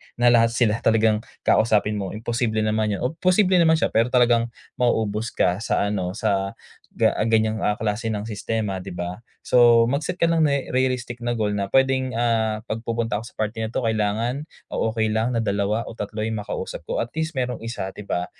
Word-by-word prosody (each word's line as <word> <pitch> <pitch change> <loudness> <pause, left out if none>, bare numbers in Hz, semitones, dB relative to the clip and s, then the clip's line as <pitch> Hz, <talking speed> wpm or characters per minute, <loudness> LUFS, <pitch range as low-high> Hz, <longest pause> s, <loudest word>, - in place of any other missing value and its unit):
na 120 0 +4
lahat 115 -1 +4
sila 115 -2 +2
talagang 110 -1 +3 0.2
kakausapin 105 -1 +2
mo, 95 0 -4
imposible 115 0 -1
naman 110 -1 0
yun. - - -5
O 125 - 0
posible 185 0 +4
naman 160 -1 +5
siya 160 - 0
pero 115 +1 +3
talagang 120 -2 +3 0.3
mauubos 110 -2 0
ka 90 +2 +2
sa 110 - 0
ano, 95 -3 -2
sa 100 -3 -1 0.4
ga - - +3 0.2
ganyang, 110 -1 +2
ah, 105 0 +1
klase 110 +1 -2
ng 105 -1 -3
sistema 105 -2 -3
'di - - -8
ba? 90 +4 -5 0.3
So 120 -2 +6
mag-set 150 +7 -2
ka - - +4
ng 165 -1 +2
ne 140 -2 +3 0.2
realistic 125 -2 -1
na 120 0 -1
goal 105 -1 0
na 100 -1 -2
pwedeng, 130 0 +2
ah, 110 -2 0
'pag 115 0 -4
pupunta 115 -2 -2
ako - - -10
sa - - -16
party 110 +1 -2
na 110 - -2
'to 120 +1 -2
kailangan 115 +6 -1 0.2
o - - 0
okey 110 -1 0
lang 115 +2 0
na - - +2
2 100 +2 0
o - - -8
3 105 0 -4
'yung 110 -1 -2
makausap - - -5
ko. - - -1
At 115 - -3
least 160 -2 -3
merong 125 -2 -2
1, 115 -4 -5
'di - - -9
ba, 90 - -1
115 Hz, 205 wpm, -23 LUFS, 105-120 Hz, 0.4 s, So